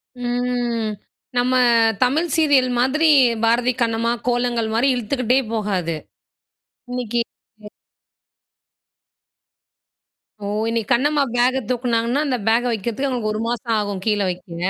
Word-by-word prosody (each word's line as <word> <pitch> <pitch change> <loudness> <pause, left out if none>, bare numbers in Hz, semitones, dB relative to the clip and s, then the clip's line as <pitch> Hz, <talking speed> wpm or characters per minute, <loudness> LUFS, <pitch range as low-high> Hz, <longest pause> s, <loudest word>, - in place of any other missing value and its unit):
ம். 245 -2 -2 0.5
நம்ம 250 +1 +2 0.5
தமிழ் 300 +7 +1
சீரியல் 285 -6 +3
மாதிரி, 305 +6 +2 0.4
"பாரதி 240 +2 +2
கண்ணம்மா", 230 0 +1 0.2
"கோலங்கள்" 240 -2 0
மாரி 235 +5 +2
இழுத்துக்கிட்டே 250 +2 0
போகாது. 190 -6 -1 0.9
இன்னைக்கு 240 -2 -2 0.4
ம். 210 - -9 2.7
ஓ! - - -6 0.2
இன்னைக்கு 230 -2 -2
கண்ணம்மா 285 +3 +3
பேக 255 +2 +2
தூக்குனாங்கன்னா, 240 +1 0
அந்த 255 -3 0
பேக 230 +2 +3
வைக்கிறதுக்கு, 230 +5 -2
அவங்களுக்கு 230 -4 -2
1 215 - -3
மாசம் 235 -1 -2
ஆகும். 205 -2 -3
கீழே 210 -2 +1
வைக்கங்க. 175 -1 -6
240 Hz, 110 wpm, -21 LUFS, 225-255 Hz, 2.7 s, சீரியல்